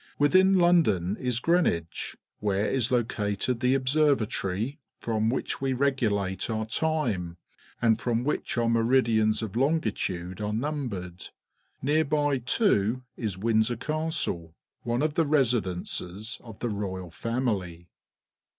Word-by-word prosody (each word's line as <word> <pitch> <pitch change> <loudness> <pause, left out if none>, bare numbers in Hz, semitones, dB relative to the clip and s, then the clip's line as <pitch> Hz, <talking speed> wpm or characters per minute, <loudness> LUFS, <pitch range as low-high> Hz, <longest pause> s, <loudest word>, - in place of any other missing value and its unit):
Within 185 +6 +5
London 155 - +3
is 125 -2 -1
Greenwich, 125 - 0 0.2
where 100 0 0
is 130 -3 +1
located 115 -1 0
the 125 +1 +3
Observatory 130 - +1 0.2
from 110 -1 0
wliich 130 - -2
we 135 -1 0
regulate 115 -9 0
our 110 -1 -1
time, 110 - -1 0.4
and 115 -1 +2
from 120 0 0
wliich 150 - -1
our 115 - +1
meridians 115 -2 +2
of 110 -2 -5
longitude 110 - -1
are 105 0 -2
numbered. 110 - -4 0.5
Near 150 +3 +3
by, 145 -2 +1
too, 125 - +1
is 105 -6 -3
Windsor 110 +3 +1
Castle, 150 - -1 0.3
one 120 +3 -1
of 155 -1 0
the 165 +1 +2
residences 110 -5 -1
of 115 -4 -11
the 120 - -1
royal 95 -4 -4
family. 95 -6 -2
115 Hz, 125 wpm, -27 LUFS, 100-140 Hz, 0.5 s, Within